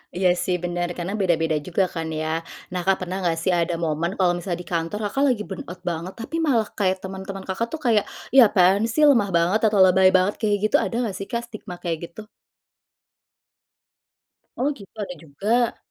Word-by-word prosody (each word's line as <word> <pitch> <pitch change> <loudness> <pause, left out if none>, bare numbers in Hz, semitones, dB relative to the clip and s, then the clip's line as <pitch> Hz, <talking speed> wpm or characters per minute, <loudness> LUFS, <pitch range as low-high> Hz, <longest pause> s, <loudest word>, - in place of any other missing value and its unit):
Iya 180 0 +3
sih 180 0 0
bener 175 0 -1
karena 175 +3 -3
beda-beda 165 -4 +1
juga 180 +2 +1
kan 165 -1 -3
ya. 155 +1 -1 0.3
Nah 180 0 -2
Kak 195 -1 +4
pernah 185 +1 -4
nggak 170 -3 0
sih 185 - +2
ada 170 -1 +1
momen 165 +2 -1
kalau 180 -2 +2
misal 175 0 -3
di 175 - -8
kantor 165 +4 -2
Kakak 210 +7 0
lagi 240 -6 +1
burnout 180 -1 -7
banget, 175 +1 -4
tapi 230 +7 -6
malah 255 -9 +2
kayak 190 -2 +2
teman-teman 190 0 -6
Kakak 195 +5 -2
tuh 320 - -4
kayak, 220 -4 +3 0.3
"Ya 260 -4 +8
apaan 195 +2 +3
sih 300 +7 +1
lemah 240 -9 +5
banget," 175 +6 +3
atau 205 -3 +5
"lebay 185 0 +5
banget," 185 +2 +2
kayak 210 -2 +2 0.2
gitu, - - +3
ada 230 - -2
nggak 205 -5 -3
sih 195 - -6
kak 235 0 -1
stigma 210 -4 -8
kayak 170 -2 -1
gitu? 215 +6 -12 2.3
Oh 265 +4 +1
gitu, 200 -3 -13
ada 185 - -6
juga. 215 +11 0
190 Hz, 190 wpm, -23 LUFS, 175-210 Hz, 2.3 s, Ya